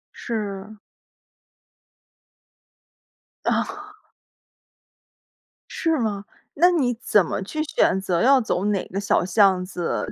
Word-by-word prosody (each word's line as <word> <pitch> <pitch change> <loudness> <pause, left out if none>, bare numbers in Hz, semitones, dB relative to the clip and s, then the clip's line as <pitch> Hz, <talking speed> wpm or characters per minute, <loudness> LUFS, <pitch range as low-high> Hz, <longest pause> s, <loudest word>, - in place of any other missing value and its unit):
是。 210 -2 -5 2.7
啊。 415 +1 -3 1.7
是 325 -2 0
吗？ 210 -5 -2 0.3
那 345 +5 +4
你 275 -9 +1
怎 205 -5 +3
么 - - -3
去 310 +10 -3
选 240 -9 +1
择 180 -3 -1
要 265 +1 +5
走 205 -4 -2
哪 205 -3 0
个 195 - -3
小 200 - +1
巷 190 0 +3
子， 180 -2 -3
210 Hz, 105 characters per minute, -23 LUFS, 190-275 Hz, 2.7 s, 要